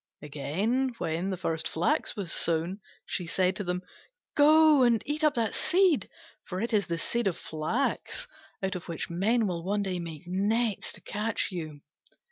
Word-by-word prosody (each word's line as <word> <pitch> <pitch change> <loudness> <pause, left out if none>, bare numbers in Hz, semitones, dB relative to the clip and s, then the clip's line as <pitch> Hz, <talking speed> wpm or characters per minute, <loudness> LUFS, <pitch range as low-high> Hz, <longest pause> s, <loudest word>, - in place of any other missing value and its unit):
Again, 195 - -1
when 170 0 -1
the 190 - -2
first 165 -2 -1
flax 170 +2 0
was 190 -5 -4
sown, 170 +4 0 0.3
she 180 - -3
said 185 +2 +1
to 205 - -3
them, 180 0 -2 0.5
"Go 305 0 +7
and 240 -3 +5
eat 300 +2 -2
up 300 -2 +4
that 230 -3 0
seed, 355 - +3 0.3
for 185 - -5
it 230 +3 -2
is 200 -5 +2
the 170 - -1
seed 235 +5 0
of 185 - 0
the - - -11
flax, 160 - -1 0.4
out 190 -1 0
of 180 - -6
which 170 0 -4
men 215 +7 +2
will 175 -4 -2
one 200 +3 0
day 185 -2 -2
make 165 -3 -7
nets 205 +4 +1
to - - -11
catch 210 +1 -1
you." 155 -5 -6
190 Hz, 180 wpm, -29 LUFS, 170-235 Hz, 0.5 s, Go